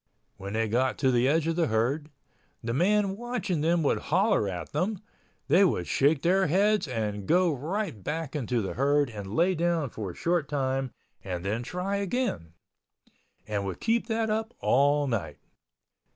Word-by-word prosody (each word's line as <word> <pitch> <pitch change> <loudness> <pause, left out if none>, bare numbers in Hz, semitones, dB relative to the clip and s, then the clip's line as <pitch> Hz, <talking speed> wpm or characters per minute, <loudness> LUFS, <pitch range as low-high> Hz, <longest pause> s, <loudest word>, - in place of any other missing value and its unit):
When 100 +1 -6
they 110 0 0
got 125 +4 +1
to 130 -2 +2
the 125 +1 +3
edge 155 +2 +2
of 165 0 0
the 165 -2 +2
herd, 135 +7 0 0.5
the 115 0 -2
man 195 - +2
watching 230 -8 -2
them 165 +1 +2
would 140 - +2
holler 185 - +2
at 90 -2 -6
them—they 185 -1 -1
would 125 - +1
shake 140 - +2
their 190 +2 +3
heads 200 +4 +2
and 105 -5 -3
go 180 -2 +3
right 155 - -3
back 160 - -4
into 125 -5 -1
the 95 - -3
herd 140 0 +2
and 100 -1 -7
lay 180 +3 +3
down 170 -5 0
for 105 -4 -5
a 85 - -9
short 170 -4 0
time 135 -2 -1 0.3
and 90 -1 -5
then 110 +4 -1
try 180 +10 -3
again, 200 - -2 0.9
and 105 -2 -2
would 95 -2 -5
keep 230 0 +1
that 225 -1 0
up 220 +2 -2
all 145 +2 +3
night. 115 -6 -3
145 Hz, 170 wpm, -28 LUFS, 115-185 Hz, 0.9 s, the